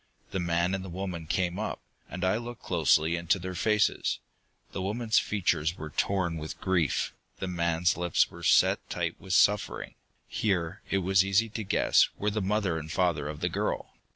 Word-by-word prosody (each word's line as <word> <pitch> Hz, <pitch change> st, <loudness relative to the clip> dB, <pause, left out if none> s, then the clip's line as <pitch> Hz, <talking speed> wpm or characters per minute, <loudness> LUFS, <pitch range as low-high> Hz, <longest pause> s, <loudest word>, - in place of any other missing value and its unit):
The 95 Hz, -, -1 dB
man 85 Hz, +1 st, +1 dB
and 95 Hz, -1 st, -2 dB
the 95 Hz, -, -7 dB
woman 90 Hz, -2 st, -5 dB
came 90 Hz, +3 st, 0 dB
up, 110 Hz, -, -3 dB, 0.3 s
and 90 Hz, -, -5 dB
I 95 Hz, +3 st, +2 dB
looked 120 Hz, 0 st, -7 dB
closely 80 Hz, -1 st, +3 dB
into 85 Hz, +2 st, +1 dB
their 90 Hz, 0 st, -5 dB
faces. 105 Hz, +3 st, +1 dB, 0.5 s
The 95 Hz, -, -4 dB
woman's 110 Hz, +4 st, +1 dB
features 85 Hz, -5 st, 0 dB
were 75 Hz, 0 st, -7 dB
torn 85 Hz, 0 st, 0 dB
with 80 Hz, 0 st, -6 dB
grief; 90 Hz, -5 st, 0 dB, 0.2 s
the 95 Hz, -, -4 dB
man's 85 Hz, 0 st, +1 dB
lips 90 Hz, -2 st, +1 dB
were -, -, -11 dB
set -, -, +4 dB
tight -, -, -3 dB
with 95 Hz, -1 st, -4 dB
suffering. 105 Hz, +2 st, +2 dB, 0.3 s
Here, 90 Hz, -6 st, -1 dB
it 95 Hz, -, +1 dB
was 95 Hz, 0 st, +4 dB
easy 100 Hz, +4 st, +2 dB
to 110 Hz, +1 st, -4 dB
guess, 100 Hz, -, +3 dB
were 105 Hz, +1 st, 0 dB
the 110 Hz, +1 st, -1 dB
mother 95 Hz, -4 st, 0 dB
and 80 Hz, 0 st, -8 dB
the -, -, -5 dB
father 85 Hz, -6 st, +1 dB
of 75 Hz, 0 st, -6 dB
the -, -, +1 dB
girl. -, -, -2 dB
90 Hz, 185 wpm, -28 LUFS, 85-100 Hz, 0.5 s, set